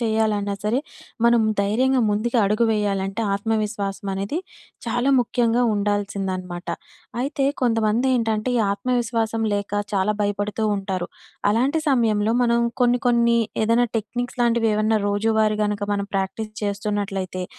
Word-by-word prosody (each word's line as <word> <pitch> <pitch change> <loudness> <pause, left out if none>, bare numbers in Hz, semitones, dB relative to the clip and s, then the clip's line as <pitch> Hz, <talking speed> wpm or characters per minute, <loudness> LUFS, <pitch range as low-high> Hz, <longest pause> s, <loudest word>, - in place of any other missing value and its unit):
చేయాలన్నా 220 -3 0
సరే, 225 +5 +1 0.5
మనం 235 -1 +5 0.2
ధైర్యంగా 255 +6 +2
ముందుకి 215 +4 0
అడుగు 210 +4 +2
వేయాలంటే, 200 -1 -1
ఆత్మవిశ్వాసం 205 -2 -2
అనేది 200 - -2 0.5
చాలా 245 +4 +1
ముఖ్యంగా 240 0 +1
ఉండాల్సింది 205 -1 -1
అనమాట. 180 -1 -8 0.5
అయితే 275 +1 -1 0.2
కొంతమంది 225 0 +2
ఏంటంటే, 225 0 0
ఈ - - +3
ఆత్మవిశ్వాసం 230 0 -1
లేక 205 0 -3 0.2
చాలా 195 +2 +1
భయపడుతూ 205 +1 -1
ఉంటారు. 190 -2 -3 0.4
అలాంటి 260 +9 +1
సమయంలో, 225 -5 +2
మనం 235 -1 +3 0.2
కొన్ని 245 0 +3
కొన్ని 235 -1 +3 0.3
ఏదైనా 230 +2 +3
టెక్నిక్స్ 245 +4 -4
లాంటివి 235 -1 +2
ఏవన్నా 215 +1 +2
రోజువారీ 215 +1 +1
గనక, 205 -1 -2
మనం 200 0 -2
ప్రాక్టీస్ 195 +3 -2
చేస్తున్నట్లయితే, 200 -2 -2
215 Hz, 125 wpm, -22 LUFS, 205-235 Hz, 0.5 s, మనం